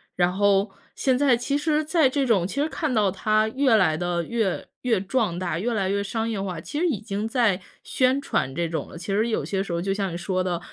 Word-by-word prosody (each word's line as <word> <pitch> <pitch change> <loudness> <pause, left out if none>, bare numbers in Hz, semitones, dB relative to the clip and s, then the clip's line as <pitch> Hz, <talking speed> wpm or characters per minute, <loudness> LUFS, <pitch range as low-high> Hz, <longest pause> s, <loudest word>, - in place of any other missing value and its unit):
然 180 0 +2
后 200 +1 +3 0.3
现 260 -2 +1
在 265 -3 +4
其 275 +4 -1
实 300 +1 +1
在 310 -3 +3
这 275 +1 0
种 200 -7 +3
其 - - -7
实 300 - +1
看 310 -3 -2
到 210 -4 +3
它 215 +3 +1
越 260 +1 +2
来 160 -7 +3
得 175 +1 -1
越 220 -1 -1
越 235 -5 +1
壮 195 -2 -1
大、 175 -3 -2
越 235 +6 -1
来 195 -4 0
越 200 +1 0
商 225 +3 -2
业 210 -4 -2
化， 185 -4 -4
其 180 - -6
实 350 - +1
已 255 - -1
经 210 0 -4
在 225 -5 +1 0.2
宣 260 +1 +2
传 135 - -1
这 170 +1 0
种 160 0 -4
了。 - - -10
其 190 +4 -4
实 215 +4 +1
有 220 - -1
些 195 -1 -1
时 195 - -7
候 170 - -1
就 195 +2 0
像 195 -2 -2
你 170 - -4
说 185 +1 -1
的， 175 -2 -1
205 Hz, 270 characters per minute, -24 LUFS, 185-250 Hz, 0.3 s, 在